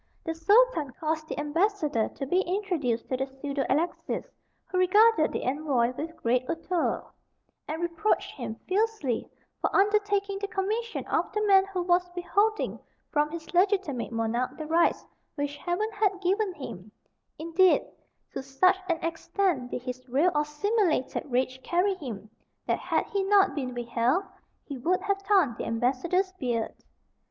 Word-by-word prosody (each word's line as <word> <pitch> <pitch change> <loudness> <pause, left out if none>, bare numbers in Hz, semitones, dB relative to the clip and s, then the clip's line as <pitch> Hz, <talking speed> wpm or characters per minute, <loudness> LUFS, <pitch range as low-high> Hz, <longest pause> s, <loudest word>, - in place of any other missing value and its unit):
The 325 - -2
Sultan 340 - +4
caused 315 -1 -2
the - - -4
ambassador 300 - +1
to 275 - -6
be 355 +7 +2
introduced 350 - -1
to 255 - 0
the 265 +1 -2
pseudo 275 +1 -3
Alexis, 335 +4 -1 0.4
who 365 - -2
regarded 390 -1 +5
the - - -3
envoy 255 -3 +1
with 325 +4 -6
great 245 +2 +1
hauteur, 335 +1 -1 0.6
and 315 +1 -3
reproached 345 +5 0
him 235 -5 -6
fiercely 395 - 0 0.3
for - - +1
undertaking 405 -1 +2
the 405 - -3
commission 430 +4 -2
of - - 0
the 425 0 0
man 385 -2 +6
who 375 -2 -2
was 355 0 +2
withholding 410 +5 0 0.3
from 300 0 +2
his 330 +1 -8
legitimate 360 - +1
monarch 230 +2 -1
the 310 - -5
rights 330 +2 +2 0.3
which 285 0 -2
Heaven 360 +8 -2
had 410 -2 +1
given 390 +2 +1
him; 215 -8 -8 0.5
indeed, 335 +3 +3 0.5
to - - -3
such 275 +9 +3
an 340 - +2
extent 330 -4 -1
did 245 - -5
his 255 0 -7
real 295 +9 +3
or 295 0 +1
simulated 310 - 0
rage 255 +1 0
carry 360 +6 +1
him, 235 - -7 0.4
that - - 0
had - - 0
he 400 -2 -1
not 395 0 +4
been 255 -4 -4
withheld 240 +8 +1 0.4
he 280 -3 -7
would 360 +8 +1
have 400 -1 -1
torn 380 - +3
the - - -3
ambassador's 275 +11 0
beard. 235 -3 -1
330 Hz, 155 wpm, -28 LUFS, 265-390 Hz, 0.6 s, man